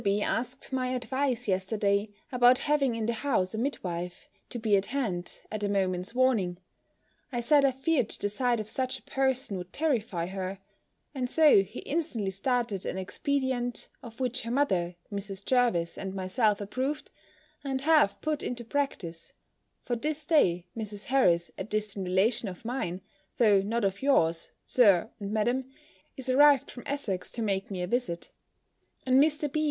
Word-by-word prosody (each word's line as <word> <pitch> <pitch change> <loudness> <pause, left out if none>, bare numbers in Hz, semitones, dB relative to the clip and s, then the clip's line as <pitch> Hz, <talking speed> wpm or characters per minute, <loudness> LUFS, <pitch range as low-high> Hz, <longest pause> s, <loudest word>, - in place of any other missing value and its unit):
B. 200 0 +2
asked 255 +3 -3
my 255 -1 0
advice 255 -1 -1
yesterday, 200 +2 +1 0.2
about 250 0 +6
having 280 -5 +1
in 225 -1 -2
the 235 - 0
house 220 -6 0
a - - -3
midwife, 180 -9 -3 0.2
to - - -5
be 220 -3 +2
at 195 0 +1
hand, 215 -10 -3
at 215 - -3
a 205 - 0
moment's 190 +1 -1
warning. 225 -9 +2 0.7
I 240 - -1
said 280 +4 +4
I 275 - +6
feared 265 -2 0
the - - -2
sight 240 +3 0
of 215 - -4
such 255 +3 -2
a - - -19
person 265 -6 0
would 180 0 -8
terrify 230 - 0
her: 190 +1 -4 0.6
and 255 -3 -2
so 300 -8 +6
he 195 +1 -7
instantly 275 - -2
started 230 -1 -1
an - - -3
expedient, 245 +4 -2
of 230 0 -11
which 255 0 0
her 230 - -6
mother, 190 -10 +1 0.2
Mrs. 200 0 -5
Jervis, 235 -10 +1
and 190 0 -5
myself, 200 +3 +1
approved, 260 +8 -3 0.5
and 265 -2 -2
have 295 -9 +4
put 305 -1 -1
into 240 -1 -4
practice; 215 - -3 0.5
for 240 - -1
this 300 +5 -3
day, 180 - +3
Mrs. 210 -2 -6
Harris, 175 -11 +3
a - - -1
distant 210 -2 -3
relation 200 +5 +2
of 180 +4 -11
mine, 190 -7 -3 0.4
though 210 -5 +5
not 220 +2 -1
of 195 0 -1
yours, 165 -12 +2
Sir 215 -4 +4
and 200 -1 -5
Madam, 240 +5 +1 0.5
is 265 - -6
arrived 280 +1 +5
from 245 - -9
Essex 230 -10 -3
to 230 - -2
make 195 -2 -1
me 185 -3 -3
a - - 0
visit; 195 -6 -2 0.7
and 260 +1 +5
Mr. 300 0 +1
B. 310 - +1
230 Hz, 170 wpm, -29 LUFS, 195-260 Hz, 0.7 s, about